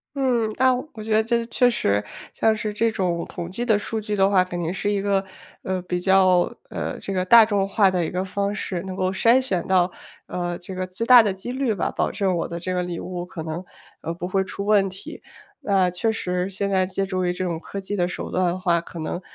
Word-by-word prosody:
嗯。 245 Hz, -5 st, +1 dB
那 260 Hz, 0 st, +4 dB, 0.2 s
我 215 Hz, -, -8 dB
觉 220 Hz, 0 st, -1 dB
得 220 Hz, +1 st, +4 dB
这 235 Hz, +1 st, 0 dB
确 245 Hz, +1 st, +3 dB
实， 105 Hz, -, +1 dB, 0.3 s
像 220 Hz, -1 st, +2 dB
是 215 Hz, -1 st, -3 dB
这 230 Hz, +2 st, +2 dB
种 175 Hz, -5 st, -1 dB
统 170 Hz, -1 st, -6 dB
计 235 Hz, +6 st, -3 dB
的 220 Hz, -4 st, +3 dB
数 220 Hz, +2 st, -3 dB
据 210 Hz, -1 st, -3 dB
的 195 Hz, -1 st, +3 dB
话， 190 Hz, -2 st, +4 dB
肯 180 Hz, -1 st, -5 dB
定 170 Hz, +1 st, -2 dB
是 205 Hz, +2 st, -1 dB
一 200 Hz, -1 st, 0 dB
个， 195 Hz, -1 st, +1 dB, 0.4 s
呃， 185 Hz, -1 st, -2 dB
比 180 Hz, 0 st, -2 dB
较， 185 Hz, -1 st, +4 dB, 0.2 s
呃， -, -, -4 dB
这 195 Hz, -, -5 dB
个 185 Hz, -1 st, 0 dB
大 230 Hz, +3 st, +8 dB
众 200 Hz, -2 st, 0 dB
化 200 Hz, -1 st, +3 dB
的 180 Hz, -2 st, 0 dB
一 -, -, -3 dB
个 180 Hz, +1 st, -1 dB
方 200 Hz, +1 st, -2 dB
式， 185 Hz, -4 st, -3 dB
能 190 Hz, -1 st, -6 dB
够 185 Hz, -1 st, 0 dB
筛 230 Hz, +6 st, +4 dB
选 190 Hz, -10 st, -2 dB
到， 185 Hz, -1 st, +3 dB, 0.4 s
呃， 175 Hz, -1 st, -3 dB
这 180 Hz, +2 st, -9 dB
个 185 Hz, 0 st, -3 dB
最 185 Hz, +5 st, -4 dB
大 245 Hz, 0 st, +9 dB
的 205 Hz, -3 st, 0 dB
几 190 Hz, +6 st, -6 dB
率 260 Hz, -3 st, 0 dB
吧， 180 Hz, -, -1 dB
保 -, -, -1 dB
证 190 Hz, -3 st, 0 dB
我 170 Hz, -, -2 dB
的 170 Hz, -, -5 dB
这 185 Hz, +2 st, -3 dB
个 180 Hz, 0 st, 0 dB
礼 175 Hz, -1 st, -4 dB
物 180 Hz, -1 st, -5 dB
可 175 Hz, -2 st, -7 dB
能， 160 Hz, +3 st, -5 dB, 0.4 s
呃， 165 Hz, -, -3 dB
不 175 Hz, +1 st, -5 dB
会 190 Hz, +1 st, +1 dB
出 200 Hz, +1 st, -6 dB
问 205 Hz, -2 st, +3 dB
题。 190 Hz, +1 st, -10 dB, 0.4 s
那 195 Hz, -8 st, +2 dB
确 180 Hz, +6 st, 0 dB
实 180 Hz, -3 st, -2 dB
现 200 Hz, +1 st, -2 dB
在 190 Hz, -1 st, +3 dB
借 190 Hz, +1 st, -2 dB
助 185 Hz, -1 st, -2 dB
于 175 Hz, -, +1 dB
这 180 Hz, -, -4 dB
种 170 Hz, -3 st, -2 dB
科 195 Hz, +3 st, -7 dB
技 200 Hz, +2 st, -4 dB
的 175 Hz, -3 st, +1 dB
手 180 Hz, -, -5 dB
段 185 Hz, -, +1 dB
的 175 Hz, +1 st, -1 dB
话， 175 Hz, -2 st, +2 dB
可 170 Hz, 0 st, -9 dB
能， 160 Hz, +3 st, -4 dB
190 Hz, 270 characters per minute, -23 LUFS, 180-210 Hz, 0.4 s, 大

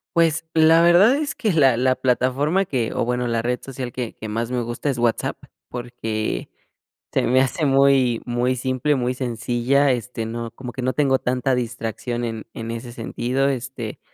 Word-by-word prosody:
Pues, 165 Hz, -1 st, +2 dB
la 160 Hz, +1 st, +6 dB
verdad 175 Hz, +9 st, +6 dB
es 295 Hz, 0 st, -2 dB
que 215 Hz, -5 st, 0 dB
la 135 Hz, -7 st, +4 dB
la 130 Hz, +1 st, +2 dB
plataforma 135 Hz, +9 st, +1 dB
que 125 Hz, -8 st, -1 dB
o -, -, 0 dB
bueno, 125 Hz, 0 st, -1 dB
la 115 Hz, -1 st, 0 dB
red 125 Hz, +2 st, -1 dB
social 130 Hz, -2 st, -6 dB
que 120 Hz, -2 st, -4 dB
que 110 Hz, -, -8 dB
más 115 Hz, +2 st, -2 dB
me 125 Hz, -1 st, 0 dB
gusta 120 Hz, +5 st, -3 dB
es 135 Hz, -, -1 dB
WhatsApp, 120 Hz, -1 st, 0 dB, 0.3 s
porque 115 Hz, -, -4 dB, 0.6 s
se -, -, +3 dB
me 130 Hz, +1 st, +3 dB
hace 135 Hz, +4 st, 0 dB
muy 135 Hz, -3 st, +4 dB
muy 125 Hz, +1 st, 0 dB
simple, 130 Hz, +3 st, 0 dB
muy 125 Hz, -1 st, 0 dB
sencilla, 125 Hz, +3 st, +1 dB
este, 120 Hz, -2 st, -3 dB
no 115 Hz, +1 st, -5 dB
como 125 Hz, -2 st, -8 dB
que 130 Hz, -, -5 dB
no 130 Hz, +1 st, +1 dB
tengo 135 Hz, -1 st, +2 dB
tanta 125 Hz, +1 st, 0 dB
distracción 120 Hz, 0 st, -3 dB
en 115 Hz, -1 st, -5 dB
en 115 Hz, 0 st, -5 dB
ese 115 Hz, +1 st, -6 dB
sentido, 125 Hz, +3 st, -1 dB
este, 130 Hz, -4 st, -4 dB
125 Hz, 185 wpm, -22 LUFS, 120-135 Hz, 0.6 s, la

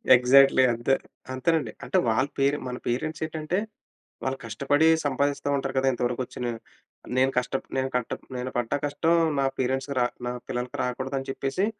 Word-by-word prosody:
Exactly 130 Hz, +2 st, +6 dB
అంతే, 120 Hz, +3 st, +1 dB, 0.4 s
అంతేనండి. 155 Hz, +5 st, +1 dB
అంటే -, -, 0 dB
వాళ్ళ 130 Hz, +5 st, +2 dB
పేరెం 140 Hz, +2 st, +2 dB
మన 125 Hz, 0 st, -4 dB
పేరెంట్స్ 155 Hz, +6 st, -2 dB
ఏటంటే, 155 Hz, +2 st, -2 dB, 0.7 s
వాళ్ళు 130 Hz, 0 st, -1 dB
కష్టపడి 140 Hz, +7 st, +2 dB, 0.2 s
సంపాదిస్తూ 140 Hz, +1 st, 0 dB
ఉంటారు 135 Hz, -1 st, -3 dB
కదా! 135 Hz, 0 st, +2 dB
ఇంతవరకు 120 Hz, 0 st, -1 dB
వచ్చిన 125 Hz, -, -6 dB, 0.7 s
"నేను 130 Hz, +1 st, +4 dB
కష్ట 125 Hz, 0 st, 0 dB, 0.2 s
నేను 130 Hz, 0 st, 0 dB
కట్ట 125 Hz, -2 st, -1 dB, 0.2 s
నేను 125 Hz, +1 st, -3 dB
పడ్డ 120 Hz, -2 st, -1 dB
కష్టం 145 Hz, +3 st, +1 dB, 0.3 s
నా 135 Hz, -, +2 dB
పేరెంట్స్‌కి 135 Hz, +2 st, -1 dB, 0.3 s
నా -, -, -1 dB, 0.2 s
పిల్లలకి 125 Hz, 0 st, -3 dB
రాకూడదు" 130 Hz, +2 st, -3 dB
అని 135 Hz, -, -8 dB
చెప్పేసి, 135 Hz, +8 st, -1 dB
135 Hz, 155 wpm, -26 LUFS, 125-140 Hz, 0.7 s, Exactly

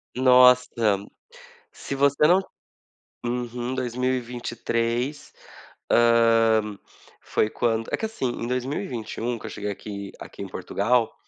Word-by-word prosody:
Nossa! 125 Hz, 0 st, +6 dB, 1.0 s
Se 140 Hz, -, -6 dB
você 140 Hz, +2 st, +3 dB
não 185 Hz, +3 st, +5 dB, 0.8 s
Uhum 120 Hz, +1 st, -3 dB
2023. 125 Hz, 0 st, -2 dB, 0.6 s
Hã, 115 Hz, -3 st, +4 dB, 0.4 s
foi 110 Hz, -, 0 dB
quando 115 Hz, -2 st, 0 dB
é -, -, +2 dB
que 220 Hz, -, -2 dB
assim, 220 Hz, -11 st, -6 dB
em 120 Hz, -, -5 dB
2021 125 Hz, -2 st, -3 dB
que -, -, -16 dB
eu -, -, -5 dB
cheguei 105 Hz, -1 st, -4 dB
aqui 100 Hz, 0 st, -7 dB
aqui -, -, -11 dB
em -, -, -5 dB
Portugal. 115 Hz, +3 st, 0 dB
120 Hz, 110 wpm, -24 LUFS, 115-125 Hz, 1.0 s, Nossa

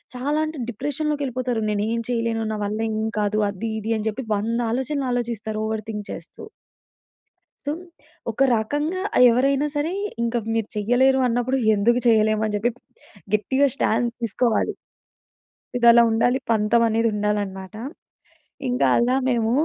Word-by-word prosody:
చాలా 285 Hz, +5 st, -1 dB
అంటే 310 Hz, -3 st, -7 dB
డిప్రెషన్‌లోకి 290 Hz, +4 st, -2 dB
వెళ్ళిపోతారు. 250 Hz, -3 st, -2 dB
నేను 205 Hz, 0 st, 0 dB
ఏమి 230 Hz, 0 st, -1 dB
చేయలేను 230 Hz, -2 st, -1 dB
నా -, -, -3 dB
వల్ల 215 Hz, +2 st, -2 dB
ఏం 215 Hz, -, -2 dB, 0.2 s
కాదు 210 Hz, +1 st, 0 dB
అది 220 Hz, +3 st, -4 dB
ఇది 225 Hz, +2 st, -1 dB
అని 215 Hz, -, -3 dB
చెప్పి 250 Hz, +4 st, -5 dB
100 230 Hz, +3 st, -1 dB
ఆలోచనలు 265 Hz, +2 st, -1 dB
ఆలోచిస్తారు 220 Hz, -3 st, -2 dB
ఓవర్ 220 Hz, -1 st, -3 dB
థింక్ 210 Hz, -1 st, -5 dB
చేస్తూ. -, -, -9 dB, 1.2 s
సో 290 Hz, -, 0 dB, 0.6 s
ఒక 220 Hz, -, -15 dB, 0.2 s
రకంగా 295 Hz, +11 st, -1 dB, 0.2 s
ఆ -, -, +5 dB
ఎవరైనా 275 Hz, +4 st, +2 dB
సరే 295 Hz, +4 st, 0 dB, 0.3 s
ఇంక 235 Hz, +1 st, -1 dB, 0.2 s
మీరు 225 Hz, -2 st, -1 dB
చేయలేరు 245 Hz, +5 st, +3 dB
అన్నప్పుడు, 245 Hz, +2 st, 0 dB, 0.2 s
ఎందుకు 235 Hz, +4 st, +3 dB
చేయలేము 215 Hz, -1 st, +3 dB
అని 210 Hz, -, -2 dB
చెప్పి 235 Hz, +4 st, 0 dB, 0.6 s
గట్టిగా 265 Hz, +6 st, +2 dB
స్టాండ్ 235 Hz, -1 st, +1 dB
తీసుకోవాలి. 230 Hz, 0 st, +1 dB, 1.0 s
ఇదిలా 235 Hz, 0 st, +7 dB
ఉండాలి, 245 Hz, +3 st, +2 dB
పంతం 220 Hz, +1 st, +3 dB
అనేది 225 Hz, +1 st, +1 dB
ఉండాలన్నమాట. 205 Hz, -2 st, -2 dB, 0.9 s
ఇంకా 250 Hz, -, +1 dB
అలా 245 Hz, +2 st, +2 dB
మేము 230 Hz, -2 st, +1 dB
230 Hz, 140 wpm, -23 LUFS, 215-255 Hz, 1.2 s, ఇదిలా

